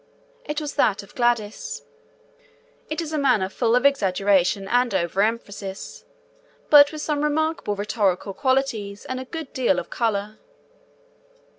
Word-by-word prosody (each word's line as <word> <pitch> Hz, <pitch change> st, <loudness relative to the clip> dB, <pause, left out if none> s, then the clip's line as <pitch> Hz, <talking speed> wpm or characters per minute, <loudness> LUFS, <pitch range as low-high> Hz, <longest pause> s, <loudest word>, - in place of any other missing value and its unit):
It 295 Hz, +1 st, -3 dB
was 300 Hz, -2 st, -5 dB
that 200 Hz, -2 st, +2 dB
of 200 Hz, -, -17 dB
Gladys. 235 Hz, -4 st, -1 dB, 1.1 s
It 310 Hz, +2 st, -2 dB
is 320 Hz, -1 st, -5 dB
a 305 Hz, -, 0 dB
manner 245 Hz, -9 st, +2 dB
full 230 Hz, +3 st, +1 dB
of 250 Hz, +2 st, +2 dB
exaggeration 195 Hz, -6 st, +2 dB
and 245 Hz, -2 st, +1 dB
overemphasis, 195 Hz, +2 st, -2 dB, 0.7 s
but 290 Hz, -1 st, +8 dB
with 310 Hz, -1 st, -6 dB
some 295 Hz, -1 st, -1 dB
remarkable 310 Hz, -7 st, 0 dB
rhetorical 200 Hz, -2 st, -1 dB
qualities 230 Hz, -6 st, -1 dB
and 255 Hz, 0 st, -4 dB
a 260 Hz, -, -6 dB
good 320 Hz, 0 st, -7 dB
deal 260 Hz, +2 st, +2 dB
of -, -, -5 dB
colour. 215 Hz, -3 st, -2 dB
235 Hz, 135 wpm, -23 LUFS, 200-280 Hz, 1.1 s, but